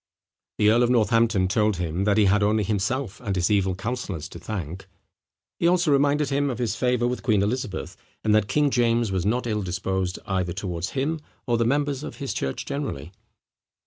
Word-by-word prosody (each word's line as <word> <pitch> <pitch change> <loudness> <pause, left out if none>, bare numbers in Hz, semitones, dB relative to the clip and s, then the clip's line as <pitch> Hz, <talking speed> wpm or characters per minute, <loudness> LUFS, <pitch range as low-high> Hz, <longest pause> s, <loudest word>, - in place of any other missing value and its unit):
The 105 0 +5
earl 120 +2 +4
of 120 - +3
Northampton 115 -4 +3
told 105 0 +1
him, 90 +2 -2
that 105 0 +3
he 105 - +5
had 105 +2 +3
only 105 +1 +2
himself 105 +3 -2
and 100 -5 -2
his 90 +2 +1
evil 95 -2 +2
councillors 100 -7 -4
to 85 - -10
thank. 90 0 -6 0.7
He 170 - +3
also 175 -3 +3
reminded 145 +1 +3
him 140 +1 +1
of 125 - -3
his 115 -4 -1
favour 125 -1 +1
with 125 0 -2
Queen 105 -5 +2
Elizabeth; 110 -1 -3 0.3
and 110 - +3
that 105 -1 +3
King 145 +4 +2
James 120 -3 +2
was 95 0 0
not 120 +4 0
ill 105 -2 -1
disposed 95 0 -2
either 95 -3 -1
towards 90 -2 -3
him 155 +5 0 0.3
or 120 -2 +1
the 115 - +2
members 145 +2 0
of 150 - -7
his 140 -2 -4
church 65 - -3
generally. 135 - -4
110 Hz, 195 wpm, -25 LUFS, 95-125 Hz, 0.7 s, The